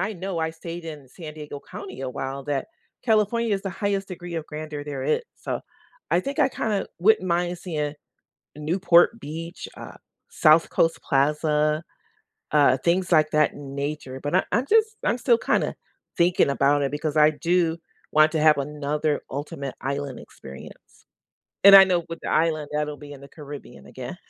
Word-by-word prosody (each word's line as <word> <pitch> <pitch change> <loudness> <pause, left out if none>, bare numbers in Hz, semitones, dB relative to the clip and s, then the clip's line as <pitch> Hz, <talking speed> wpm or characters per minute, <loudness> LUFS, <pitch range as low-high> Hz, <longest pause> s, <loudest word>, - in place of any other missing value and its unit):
I 210 +3 -1
know 185 -1 -4
I 160 0 -1
stayed 165 +1 -8
in 150 -4 -9
San 155 +2 -10
Diego 150 -2 -8
County - - -8
a 130 - -3
while, 135 +1 -5
that 145 -1 -2 0.4
California 220 0 +2
is 195 - -4
the 195 - -3
highest 195 +1 -2
degree 175 -2 -7
of 160 -1 -4
grandeur 150 -1 -6
there 140 -3 -5
is. 485 - +1
So - - -4 0.5
I 170 - +3
think 275 +8 -5
I - - +5
kinda 210 -5 -2
wouldn't 205 0 +4
mind 175 +1 0
seeing 150 -5 -3 0.6
Newport 175 +7 +3
Beach, 165 +1 -7
uh, - - -10 0.3
South 155 +1 +4
Coast 165 0 +1
Plaza, 150 +2 +1 0.7
uh, 145 -3 +5
things 175 +4 0
like 155 -2 +4
that 150 -1 +3
in 140 -1 -9
nature. 140 -2 -4
But 145 +5 -1
I 185 - +4
I'm 240 +4 +1
just 440 0 +3
I'm 240 - +2
still 240 -2 +3
kinda - - 0 0.4
thinking 175 -4 +3
about 140 +1 +2
it 140 - -1
because 150 +1 -2
I 150 0 +7
do 170 +1 +1 0.3
want 155 +1 +5
to 160 - +1
have 155 -1 +6
another 150 +1 -1
ultimate 140 -1 -5
island 140 -1 -3
experience, 65 +1 -13 0.6
and 200 0 +10
I 195 - +10
know 180 -3 0
with 165 - -5
the - - -4
island, 155 -2 +1
that'll 150 -1 -2
be 145 -1 -11
in 140 - -11
the 140 - -12
Caribbean 140 - -11
again. - - -8
155 Hz, 180 wpm, -24 LUFS, 145-180 Hz, 0.7 s, and